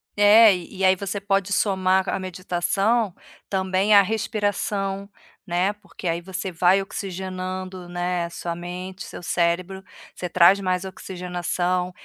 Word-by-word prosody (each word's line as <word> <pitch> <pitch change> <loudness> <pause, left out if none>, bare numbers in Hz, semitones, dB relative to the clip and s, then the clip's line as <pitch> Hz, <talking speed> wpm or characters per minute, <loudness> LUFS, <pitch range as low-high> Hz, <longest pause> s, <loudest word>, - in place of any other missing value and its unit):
É, 210 0 +7
e 180 +2 -9
e 190 - +1
aí 185 - +6
você 200 +2 -4
pode 195 -1 0
somar 190 -1 +2
c - - -2
a - - -1
meditação, 185 +3 0 0.3
também 190 +2 +2
a 200 - +9
respiração, 205 -2 -2 0.4
né, 185 +2 0
porque 205 -3 -9
aí 170 +1 -1
você 190 +1 -5
vai 180 +3 +4
oxigenando, 185 -1 -5
né, 175 0 -1
a - - -6
sua 170 0 -5
mente, 180 +2 -7
seu - - -9
cérebro, 175 +3 0 0.3
você 180 - -5
traz 180 +3 +6
mais 185 0 -1
oxigenação, 180 -1 -2
185 Hz, 145 wpm, -23 LUFS, 180-195 Hz, 0.4 s, a